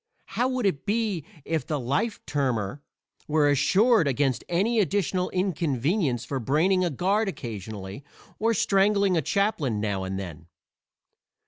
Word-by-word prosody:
How 245 +2 -1
would 255 -3 -1
it 185 -2 -1
be 210 -6 0 0.2
if 160 -5 -2
the 150 -2 -1
"life 140 - -1
termer" 130 -4 -1 0.5
were 150 -1 +3
assured 195 - +4
against 135 -1 0
any 210 +7 +2
additional 185 -1 0
inconvenience 160 - 0
for 135 - -3
braining 165 - +2
a 175 - +1
guard 195 - +1
occasionally, 105 - -7 0.4
or 230 +1 +2
strangling 200 -1 +3
a 165 - +2
chaplain 155 - 0
now 100 -2 -1
and 95 0 -3
then? 85 -4 -7
160 Hz, 135 wpm, -26 LUFS, 125-200 Hz, 0.5 s, assured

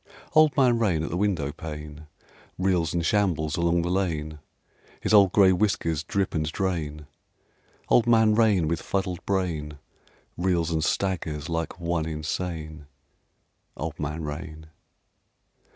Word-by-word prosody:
Old 155 -1 +5
Man 125 -4 +4
Rain 90 -9 +1
at - - -4
the - - -2
windowpane 75 -4 -3 0.5
Reels 90 -3 +1
and 85 -1 -1
shambles 85 -7 +1
along 85 0 +1
the 85 - -2
lane: 80 -5 -2 0.6
His - - -1
old 100 -3 +7
gray 95 -2 +6
whiskers 85 -6 0
drip 100 +1 -1
and 75 -1 -1
drain: 80 -6 -3 0.8
Old 120 -1 +4
Man 110 -2 +5
Rain 105 -7 +3
with 85 +1 -1
fuddled 95 -3 -2
brain 80 -7 -2 0.6
Reels 85 -2 +1
and 80 -1 0
staggers 80 -5 -1
like 80 +1 -3
one 85 -2 -1
insane. 80 -1 -4 0.9
Old 80 +3 -5
Man 75 +2 -3
Rain. 80 +1 -6
85 Hz, 130 wpm, -26 LUFS, 75-95 Hz, 0.9 s, old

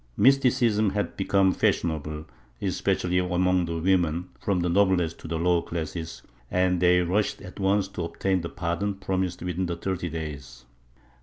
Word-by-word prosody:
Mysticism 120 -4 +4
had 100 +1 -2
become 95 -1 +3
fashionable, 75 -2 -1 0.3
especially 90 0 0
among 90 0 +1
the 85 0 -3
women, 90 -1 +1
from 100 -4 0
the 90 - 0
noblest 90 -2 +2
to - - -9
the 80 0 -2
lower 85 +1 +2
classes, 80 0 -5 0.3
and 90 -1 +2
they 90 0 +4
rushed 95 +4 0
at 95 +1 -11
once 100 0 +2
to 90 -3 -4
obtain 90 +2 -1
the 85 - -5
pardon 85 +5 -2
promised 95 -2 -2
within 90 0 -2
the 85 - -2
thirty 90 0 -3
days. 70 -6 -7
90 Hz, 155 wpm, -26 LUFS, 85-95 Hz, 0.3 s, Mysticism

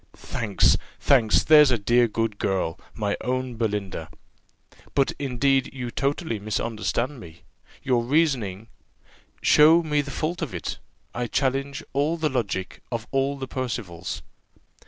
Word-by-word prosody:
"Thanks! 105 -4 +1 0.2
thanks! 115 -6 +4
there's 150 -2 +7
a 125 - +2
dear 120 +3 +3
good 115 -1 -2
girl! 95 -3 -1 0.2
my 105 -2 -1
own 130 -1 -2
Belinda!" 100 -7 -3 0.9
"But 135 -1 +3
indeed 135 0 +1
you 125 -2 -4
totally 140 -3 -1
misunderstand 110 +5 -2
me; 85 -6 -13 0.4
your 125 -3 +2
reasoning 120 - 0 0.4
" - - -30 0.3
"Show 160 +3 +6
me 150 -2 +1
the 140 - -8
fault 160 +6 -3
of 135 - -4
it: 85 - -4 0.3
I 120 0 -2
challenge 135 +2 -1
all 145 +4 +1
the 160 -2 0
logic 100 -8 -3
of 115 -2 -3
all 135 +1 0
the 135 -1 -5
Percivals." 100 -10 -4
125 Hz, 135 wpm, -25 LUFS, 105-140 Hz, 0.9 s, there's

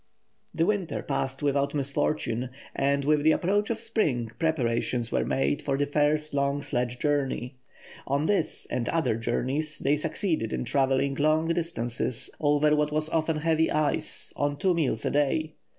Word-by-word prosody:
The 165 0 +2
winter 200 -3 -1
passed 135 +2 -2
without 140 0 +1
misfortune, 135 -3 0 0.3
and 140 0 +1
with 150 0 +3
the 155 +1 +5
approach 205 +5 +1
of 230 -1 -1
spring 155 - 0
preparations 120 -6 0
were - - +1
made 140 +2 0
for 135 -1 -1
the 145 - +1
first 150 +1 +1
long 140 0 0
sledge 120 0 -2
journey. 135 -2 -1 0.5
On 140 +3 +1
this, 190 -3 0
and 120 -1 -1
other 160 -9 +1
journeys, 135 +7 -1
they 140 +1 +2
succeeded 155 - -1
in - - -2
travelling 135 +2 +1
long 155 +3 +2
distances 125 -8 -1
over 150 0 +3
what 150 0 +1
was 155 +1 0
often 160 -1 0
heavy 160 +1 +2
ice, 155 -1 0
on 145 0 -1
two 185 +4 +2
meals 135 -10 0
a - - +1
day. 150 +2 +1
145 Hz, 160 wpm, -27 LUFS, 135-160 Hz, 0.5 s, the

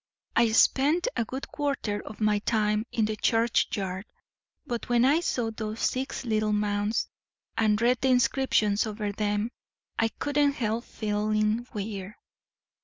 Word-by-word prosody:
"I 230 -1 +4
spend 295 - +4
a - - +1
good 265 +4 -6
quarter 280 -8 -2
of 215 - -10
my 210 -1 +2
time 215 +1 0
in 220 - +1
the 215 0 -2
churchyard; 210 -4 0 0.6
but 240 -5 -4
when 240 0 +4
I 290 +5 +4
saw 240 -9 -1
those 220 0 -5
six 265 0 -1
little 215 -2 +1
mounds, 210 +1 0 0.5
and 215 -1 +2
read 240 +1 +3
the 265 - +2
inscriptions 245 -5 +2
over 210 -1 -3
them, 210 +2 -1 0.5
I 225 - +4
couldn't 285 +4 +1
help 230 -2 -2
feeling 215 +1 0
queer. 205 -3 -6
220 Hz, 140 wpm, -27 LUFS, 210-245 Hz, 0.6 s, I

